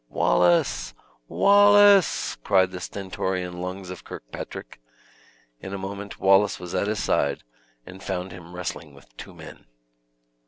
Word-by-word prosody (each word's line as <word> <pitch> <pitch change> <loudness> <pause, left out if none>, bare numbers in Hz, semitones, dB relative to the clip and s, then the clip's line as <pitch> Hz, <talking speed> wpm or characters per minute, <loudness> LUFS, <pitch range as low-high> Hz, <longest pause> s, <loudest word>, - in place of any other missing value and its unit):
"Wallace! 85 +9 +1 0.3
Wallace!" 205 -1 +5
cried 95 -1 +3
the 90 - -7
stentorian 90 -1 -4
lungs 90 0 -6
of 90 - -9
Kirkpatrick. - - -9 0.8
In 95 +1 -7
a - - -4
moment 100 +1 -7
Wallace 95 +1 +3
was 90 -1 -8
at 100 - 0
his 105 0 -2
side, 70 -1 0 0.4
and 95 +1 -12
found 95 -1 -4
him 90 -1 -12
wrestling 85 -4 -6
with 70 -3 -20
two - - -11
men. - - -13
95 Hz, 130 wpm, -24 LUFS, 90-100 Hz, 0.8 s, Wallace